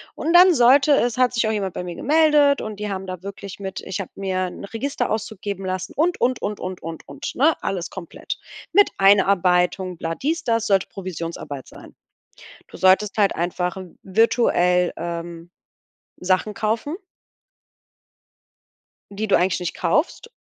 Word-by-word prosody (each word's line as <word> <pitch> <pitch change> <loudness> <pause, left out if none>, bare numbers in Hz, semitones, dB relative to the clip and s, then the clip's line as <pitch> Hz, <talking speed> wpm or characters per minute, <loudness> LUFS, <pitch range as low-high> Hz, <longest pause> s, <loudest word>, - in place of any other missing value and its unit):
Und 330 +2 -1
dann 360 0 +8
sollte 270 +4 +5
es 245 -2 +1
hat 250 -1 +3
sich 230 -2 +1
auch - - +1
jemand 195 -4 -3
bei - - -4
mir 175 -1 -6
gemeldet 295 -1 +3
und 215 -2 -6
die 210 -1 -3
haben 190 -1 -4
da 185 -1 -7
wirklich 200 0 -8
mit 190 -1 -6
ich 190 +1 -5
habe 185 - -8
mir 185 -1 -2
'n 190 - -8
Registerauszug 220 -3 -3
geben 195 -2 -4
lassen 185 +1 -4
und, 345 +4 +1
und, 250 0 +1
und, 210 0 -3
und, 185 0 -6
und, 165 0 -8
und, - - -6
ne? 305 +5 +4
Alles 185 -2 -3
komplett. 180 -4 -7 0.3
Mit 410 0 +6
Einarbeitung, 185 -2 +3
bla, 165 0 -3
dies, 325 +4 -2
das 230 -1 0
sollte 195 -2 +2
Provisionsarbeit 165 -7 -6
sein. - - -14 0.7
Du - - -12
solltest 190 +3 +3
halt 205 -2 +3
einfach 180 +1 -2
v 185 -2 -9
virtuell, 180 -4 +2
ähm, 170 0 -6 0.7
Sachen 185 +3 +1
kaufen 225 - -2 2.2
die 215 +2 -3
du - - +4
eigentlich 180 0 +1
nicht 180 - -3
kaufst 360 - -1
195 Hz, 160 wpm, -22 LUFS, 180-235 Hz, 2.2 s, dann